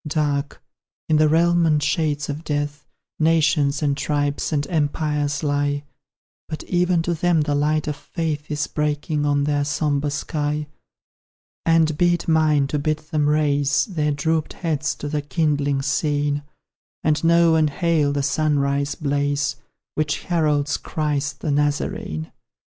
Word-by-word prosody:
Dark, 145 -2 -1 0.4
in 155 - +3
the 155 0 +4
realm 170 +2 +3
and 150 -2 +2
shades 150 0 0
of 150 +2 -5
Death, 145 -1 -3 0.3
Nations, 155 -2 +2
and 140 -1 +2
tribes, 145 +1 -1
and 145 -2 0
empires 150 -2 -1
lie, 145 0 0 0.7
But 155 - -5
even 175 -1 +1
to 175 - 0
them 170 0 +2
the 150 -1 0
light 150 +1 +1
of 150 - -1
Faith 155 -4 -4
Is 150 -1 -1
breaking 150 0 -1
on 145 0 +2
their 145 0 +1
sombre 145 0 0
sky: 150 0 -2 1.0
And 165 -2 +4
be 175 0 +4
it 170 - -7
mine 155 -3 +3
to 150 - -1
bid 155 +1 0
them 150 -1 -1
raise 145 -1 +2
Their 155 -7 -1
drooped 155 +2 -1
heads 155 -4 -2
to 150 - -6
the 150 0 -1
kindling 145 -1 0
scene, 145 0 0 0.6
And 155 0 +1
know 170 0 +5
and 155 -1 +3
hail 155 -1 +1
the 140 0 -1
sunrise 140 -1 +1
blaze 145 0 0 0.4
Which 155 -1 -1
heralds 150 -4 +1
Christ 145 -2 -2
the 155 - -1
Nazarene. 145 - -1
150 Hz, 145 wpm, -22 LUFS, 145-155 Hz, 1.0 s, know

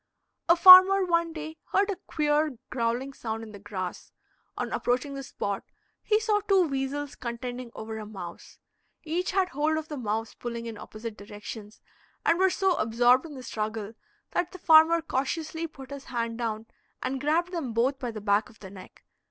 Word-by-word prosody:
A 340 - +8
farmer 370 +2 +9
one 335 -1 +1
day 315 0 -7 0.2
heard 400 +1 +3
a - - -2
queer 300 -2 +1
growling 245 +3 -1
sound 225 -3 -5
in 220 - -10
the 205 - -10
grass; 190 -3 -6 0.5
on - - -3
approaching 250 +3 -1
the 275 - -5
spot 200 -6 -4 0.4
he 425 0 +2
saw 435 -2 +1
two 390 -2 +3
weasels 275 +1 -3
contending 245 0 -6
over 220 0 -6
a 215 - -7
mouse; 180 -5 -9 0.5
each 340 +3 -2
had 380 -1 +1
hold 310 0 0
of 315 0 -5
the 300 - -5
mouse 225 -2 -3
pulling 235 -1 -6
in 230 -1 -6
opposite 215 +1 -8
directions, 205 +1 -10 0.4
and 335 - +3
were 380 0 +5
so 385 0 +1
absorbed 240 +5 +3
in 295 - -10
the 260 - -9
struggle 215 -2 -4 0.4
that 355 0 -1
the - - -7
farmer 325 0 +6
cautiously 320 +3 -2
put 270 -3 -13
his 280 -1 -8
hands 230 -2 -3
down 220 -2 -3 0.4
and 260 +1 -2
grabbed 330 +5 +1
them 325 -9 -3
both 250 +5 +1
by 250 - -3
the 220 -2 -6
back 205 +1 +1
of 220 - -19
the 190 -2 -10
neck. 190 -2 -13
265 Hz, 185 wpm, -27 LUFS, 225-325 Hz, 0.5 s, farmer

